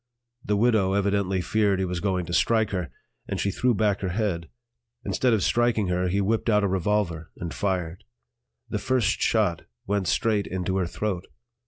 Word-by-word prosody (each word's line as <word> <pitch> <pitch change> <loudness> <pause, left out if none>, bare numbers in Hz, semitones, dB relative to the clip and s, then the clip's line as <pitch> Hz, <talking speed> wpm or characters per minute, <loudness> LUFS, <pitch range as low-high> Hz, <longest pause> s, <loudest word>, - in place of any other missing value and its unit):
The 105 0 0
"widow" 105 -4 +3
evidently 100 -2 +1
feared 105 0 +1
he 95 - 0
was 90 -1 -3
going 95 -2 -1
to 85 - -6
strike 110 +4 +2
her, 90 -5 -2 0.4
and - - -3
she 100 - 0
threw 125 +4 +1
back 105 -2 +1
her 95 - -1
head. 90 -5 -2 0.6
Instead 125 - +1
of 110 -5 +2
striking 120 -5 +2
her 90 0 +1
he 95 +3 0
whipped 110 +4 0
out 105 -1 +3
a - - +3
revolver 95 -4 -1
and 85 -1 -5
fired; 90 -3 -2 0.6
the - - -2
first 120 -5 +1
shot 100 -8 +2 0.2
went 100 -2 -1
straight 105 0 +1
into 95 +1 -2
her 90 -2 0
throat. 95 -1 -3
100 Hz, 180 wpm, -25 LUFS, 90-105 Hz, 0.6 s, widow